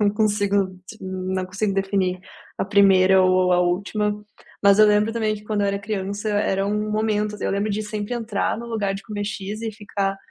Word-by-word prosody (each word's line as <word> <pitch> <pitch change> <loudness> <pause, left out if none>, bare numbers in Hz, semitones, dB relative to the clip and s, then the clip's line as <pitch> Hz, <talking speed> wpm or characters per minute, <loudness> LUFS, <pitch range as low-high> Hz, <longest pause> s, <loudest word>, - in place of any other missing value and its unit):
não 205 -1 +3
consigo 205 -3 +1 0.2
não 185 0 -3
consigo 200 +1 -2
definir 195 -2 0 0.4
a - - 0
primeira 190 -2 +5
ou 185 0 +3
a 180 - +4
última. 205 +4 -1 0.4
Mas 200 +1 +5
eu 215 - +8
lembro 210 +1 +3
também 220 -2 0
que 210 0 -11
quando 210 -1 -1
eu - - +2
era 200 0 -1
criança, 200 0 -4
era 195 -1 0
um 210 +1 -1
momento 210 -1 0
assim, - - -6
eu - - 0
lembro 205 +2 -1
de 215 +2 -2
sempre 210 +2 -4
entrar 225 -2 -2
no 235 - -7
lugar 205 -4 -1
de 195 - -7
comer 205 -1 -5
X 210 +1 -5
e 225 - -2
ficar: 200 -2 -3
205 Hz, 205 wpm, -22 LUFS, 195-215 Hz, 0.4 s, eu